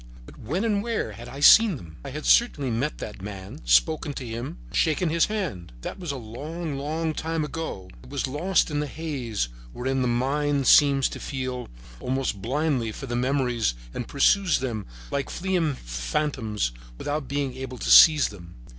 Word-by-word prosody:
But -, -, -14 dB
when 170 Hz, -, -2 dB
and 205 Hz, -3 st, +1 dB
where 230 Hz, 0 st, -2 dB
had 120 Hz, +1 st, -10 dB
I 135 Hz, +3 st, -8 dB
seen 220 Hz, +5 st, +8 dB
them? 80 Hz, -, -11 dB
I 140 Hz, -, -6 dB
had 150 Hz, +3 st, -6 dB
certainly 145 Hz, -, +3 dB
met 130 Hz, +7 st, -1 dB
that 105 Hz, -3 st, -7 dB
man, 100 Hz, +7 st, -8 dB
spoken 155 Hz, -2 st, +3 dB
to 135 Hz, -, -6 dB
him, 120 Hz, +8 st, -5 dB, 0.2 s
shaken 160 Hz, +1 st, +2 dB
his 165 Hz, +1 st, +3 dB
hand. 160 Hz, -, -4 dB
That -, -, -6 dB
was 175 Hz, -5 st, -3 dB
a -, -, -4 dB
long, 145 Hz, +7 st, -6 dB
long 155 Hz, +3 st, -2 dB
time 160 Hz, 0 st, -2 dB
ago. 150 Hz, -, -5 dB
It 60 Hz, -, -15 dB
was -, -, -2 dB
lost 160 Hz, +6 st, +1 dB
in 145 Hz, -, 0 dB
the 150 Hz, -, -1 dB
haze 130 Hz, -, -3 dB, 0.2 s
wherein 130 Hz, +1 st, -1 dB
the 125 Hz, -, +1 dB
mind 140 Hz, +3 st, +1 dB
seems 140 Hz, -1 st, +6 dB
to -, -, -7 dB
feel 130 Hz, -2 st, -4 dB, 0.3 s
around 130 Hz, -6 st, -2 dB
blindly 130 Hz, -1 st, 0 dB
for 135 Hz, -, -7 dB
memories 125 Hz, -, +1 dB, 0.2 s
and 120 Hz, -, -4 dB
pursues 185 Hz, +6 st, +3 dB
them 115 Hz, -6 st, -4 dB, 0.2 s
like 140 Hz, -1 st, -2 dB
fleeing 175 Hz, -5 st, 0 dB
phantoms 105 Hz, -, -2 dB, 0.3 s
without 145 Hz, -, -3 dB
being 140 Hz, -1 st, -2 dB
able 130 Hz, -1 st, -6 dB
to -, -, -1 dB
seize 155 Hz, -3 st, +8 dB
them. 85 Hz, -4 st, -12 dB
135 Hz, 175 wpm, -25 LUFS, 120-155 Hz, 0.3 s, seen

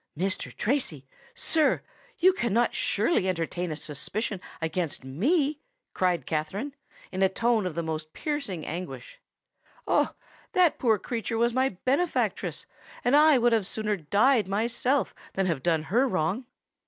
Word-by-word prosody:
"Mr. 190 Hz, +3 st, -1 dB
Tracy—sir—you 290 Hz, -, 0 dB
cannot 235 Hz, -, +1 dB
surely 210 Hz, -, +1 dB
entertain 175 Hz, 0 st, -2 dB
a -, -, -2 dB
suspicion 175 Hz, +7 st, -4 dB, 0.2 s
against 160 Hz, -3 st, -2 dB
me!" 280 Hz, -, +1 dB, 0.3 s
cried 180 Hz, -7 st, +1 dB
Katherine, 190 Hz, -, -2 dB, 0.4 s
in 190 Hz, -, -3 dB
a 190 Hz, -, +5 dB
tone 225 Hz, 0 st, +1 dB
of 165 Hz, -, -5 dB
the 170 Hz, -, -1 dB
most 155 Hz, -1 st, -4 dB
piercing 280 Hz, -, -3 dB
anguish. 185 Hz, -, -6 dB, 0.7 s
"Oh! -, -, +2 dB, 0.4 s
that 360 Hz, -3 st, +4 dB
poor 225 Hz, -4 st, +3 dB
creature 230 Hz, +1 st, -3 dB
was 235 Hz, +1 st, +2 dB
my 260 Hz, -6 st, +1 dB
benefactress; 285 Hz, +7 st, 0 dB, 0.4 s
and 245 Hz, +3 st, +4 dB
I 300 Hz, -1 st, +7 dB
would 240 Hz, -1 st, +3 dB
sooner 210 Hz, +2 st, -1 dB
have 160 Hz, -6 st, -15 dB
died 225 Hz, +1 st, +4 dB
myself 235 Hz, +6 st, 0 dB, 0.2 s
than 195 Hz, -, 0 dB
have 165 Hz, -7 st, -1 dB
done 160 Hz, 0 st, +1 dB
her 240 Hz, +11 st, +2 dB
wrong!" 190 Hz, +5 st, -1 dB
210 Hz, 135 wpm, -27 LUFS, 170-260 Hz, 0.7 s, I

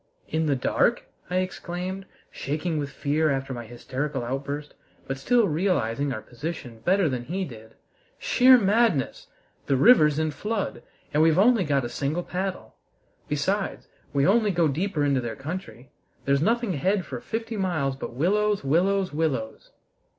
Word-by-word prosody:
"In 160 Hz, 0 st, 0 dB
the 140 Hz, -, +2 dB
dark?" 125 Hz, -, +1 dB, 0.3 s
I 180 Hz, -, -2 dB
exclaimed, 185 Hz, +1 st, -3 dB, 0.2 s
shaking 155 Hz, +3 st, -2 dB
with 140 Hz, -1 st, -3 dB
fear 150 Hz, +3 st, 0 dB
after 135 Hz, -1 st, -2 dB
my 120 Hz, -2 st, -7 dB
hysterical 130 Hz, +3 st, -4 dB
outburst, 140 Hz, +3 st, -4 dB, 0.3 s
but 135 Hz, 0 st, -4 dB
still 235 Hz, -, +3 dB
realizing 145 Hz, -, 0 dB
our 110 Hz, -5 st, -5 dB
position 125 Hz, -3 st, -7 dB
better 185 Hz, -, +2 dB
than 125 Hz, -4 st, -3 dB
he 185 Hz, +6 st, -2 dB
did. 110 Hz, -5 st, -12 dB, 0.4 s
"Sheer 255 Hz, +1 st, +6 dB
madness! 205 Hz, -, +1 dB, 0.4 s
The 135 Hz, -, +2 dB
river's 150 Hz, -, +6 dB
in 155 Hz, 0 st, 0 dB
flood, 210 Hz, +7 st, -3 dB, 0.3 s
and 150 Hz, -, +3 dB
we've 160 Hz, 0 st, +4 dB
only 220 Hz, +1 st, +5 dB
got 140 Hz, -5 st, +1 dB
a -, -, -1 dB
single 145 Hz, +7 st, -2 dB
paddle. 185 Hz, +1 st, -4 dB, 0.5 s
Besides, 190 Hz, +8 st, -1 dB, 0.2 s
we 140 Hz, -1 st, +2 dB
only 215 Hz, +2 st, +4 dB
go 175 Hz, -4 st, +2 dB
deeper 155 Hz, +1 st, -1 dB
into 140 Hz, -2 st, +2 dB
their 120 Hz, -2 st, -4 dB
country! 135 Hz, -, -7 dB, 0.3 s
There's 140 Hz, 0 st, +2 dB
nothing 230 Hz, +1 st, +1 dB
ahead 185 Hz, +5 st, 0 dB
for 125 Hz, -3 st, -6 dB
fifty 225 Hz, 0 st, -4 dB
miles 165 Hz, -9 st, -1 dB
but 135 Hz, -, -7 dB
willows, 205 Hz, +7 st, +1 dB
willows, 185 Hz, +5 st, +1 dB
willows!" 135 Hz, -8 st, -2 dB
155 Hz, 155 wpm, -25 LUFS, 135-190 Hz, 0.5 s, Sheer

